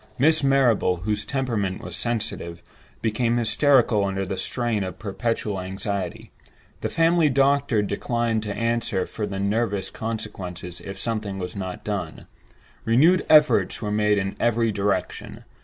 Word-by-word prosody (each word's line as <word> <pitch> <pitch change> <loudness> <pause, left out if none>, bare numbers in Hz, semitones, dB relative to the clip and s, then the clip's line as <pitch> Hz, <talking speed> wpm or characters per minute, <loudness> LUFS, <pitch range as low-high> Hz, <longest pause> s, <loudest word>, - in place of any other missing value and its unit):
Miss 155 +3 +4
Marrable, 120 -10 +3
whose 105 +1 -1
temperament 115 -9 -2
was 90 -2 -7
sensitive, 110 -7 -3 0.4
became 115 +2 +1
hysterical 120 -2 +3
under 95 0 -1
the 95 - -3
strain 115 -1 -1
of 95 - -6
perpetual 105 -2 -2
anxiety; 95 -1 -4 0.5
the - - -2
family 165 -1 +3
doctor 135 -4 +2
declined 115 +2 -1
to 105 -2 -4
answer 115 -5 0
for 105 -2 -4
the 100 -1 -4
nervous 100 0 -1
consequences 95 -6 -6
if 100 0 -7
something 105 -3 -3
was 90 -1 -5
not 95 -2 -5
done. 100 -7 -4 0.6
Renewed 155 +11 +4
efforts 150 -1 +5
were 105 -2 -3
made 105 0 +2
in 95 0 -2
every 115 -1 +2
direction. 100 -2 -2
110 Hz, 140 wpm, -24 LUFS, 95-120 Hz, 0.6 s, efforts